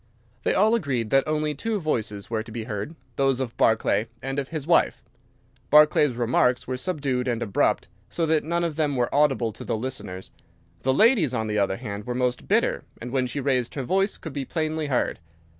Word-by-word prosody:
They - - +1
all 215 +4 +4
agreed 130 - -1
that 135 +2 +3
only 155 0 0
two 215 +9 -2
voices 110 - -2
were 110 -1 -1
to 110 - -10
be 115 0 -4
heard, 110 +7 -5 0.2
those 135 -2 +2
of 125 -3 -3
Barclay 110 0 +2
and 135 +2 -3
of 135 - -3
his 155 -3 -5
wife. 170 0 +2 0.7
Barclay's 150 -3 +5
remarks 125 +1 +2
were 130 - -3
subdued 135 -4 -2
and 120 -2 0
abrupt, 100 - +1 0.2
so 165 - -1
that 160 -1 +2
none 170 +3 -1
of 165 -3 -2
them 150 -3 +1
were 120 -1 0
audible 135 -6 +2
to - - -9
the - - -2
listeners. 110 -6 -6 0.5
The 130 - +2
lady's, 195 - +4
on 110 - -1
the 105 -1 0
other 95 -1 +1
hand, 100 +2 -6
were 125 - -2
most 125 0 -1
bitter, - - +2 0.2
and 120 +1 -7
when 130 -1 +1
she 140 - -4
raised 130 -3 0
her 135 - -2
voice 195 - +1
could 160 - -8
be 140 -1 -3
plainly 155 +1 -2
heard. 130 -3 0
135 Hz, 205 wpm, -25 LUFS, 120-155 Hz, 0.7 s, Barclay's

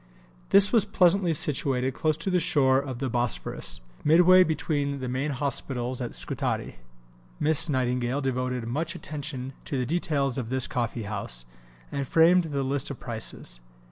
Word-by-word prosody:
This 200 0 +6
was 225 -4 +5
pleasantly 185 -3 +3
situated 135 -5 0
close 155 +3 0
to 175 +4 -2
the 180 - +3
shore 135 -6 +3
of 135 -3 -5
the 135 +1 -2
Bosphorus, 120 - -2 0.2
midway 180 +4 +7
between 145 -4 -1
the 130 - -4
main 130 +4 -1
hospitals 130 -2 -2
at 120 - -5
Scutari. - - -3 0.6
Miss 155 +1 +2
Nightingale 125 -1 0
devoted 125 -2 -2
much 155 +8 -3
attention 135 -3 -6
to 140 - -3
the 125 - 0
details 145 -4 0
of 115 -3 -5
this 130 0 0
coffee 120 -1 -3
house, 100 - -4 0.5
and 140 -1 -3
framed 170 +4 +5
the 140 -3 -2
list 135 0 -2
of 140 - -7
prices. 110 - -3
135 Hz, 155 wpm, -27 LUFS, 125-160 Hz, 0.6 s, midway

